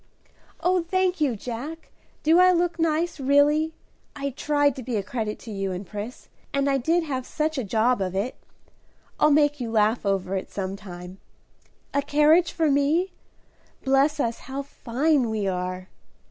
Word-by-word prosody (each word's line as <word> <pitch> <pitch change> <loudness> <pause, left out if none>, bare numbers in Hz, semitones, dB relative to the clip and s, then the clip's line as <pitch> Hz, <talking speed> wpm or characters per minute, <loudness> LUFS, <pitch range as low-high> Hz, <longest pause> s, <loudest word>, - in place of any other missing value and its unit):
"Oh, 360 0 +2
thank 370 0 0
you, 270 -6 +2
Jack! 255 +9 -7 0.3
Do 325 +3 +5
I 365 0 +7
look 345 -1 0
nice, 325 0 0
really? 290 +3 +3 0.4
I 280 -1 -3
tried 290 0 +1
to - - -5
be 245 -1 -3
a 205 - 0
credit 215 0 -3
to 225 - -9
you 195 -2 -2
and 185 +2 -5
Pris, 210 +6 -7 0.2
and 280 0 +1
I 275 -1 +2
did 330 +7 +2
have 265 -5 -3
such 310 +4 -2
a - - -1
job 225 +3 +1
of 185 -1 -2
it. 205 +7 -1 0.9
I'll 300 - +5
make 290 -1 +3
you 235 - -3
laugh 220 +1 +2
over 195 -2 0
it 190 - -4
some 195 -1 -4
time. 180 -2 -10 0.7
A 285 - +2
carriage 300 +4 +4
for 320 -3 +1
me? 300 +7 +2 0.7
Bless 275 +3 +3
us, 235 -4 -1
how 275 +1 -3
fine 275 0 0
we 215 -2 -1
are!" 185 0 -3
275 Hz, 170 wpm, -25 LUFS, 215-310 Hz, 0.9 s, I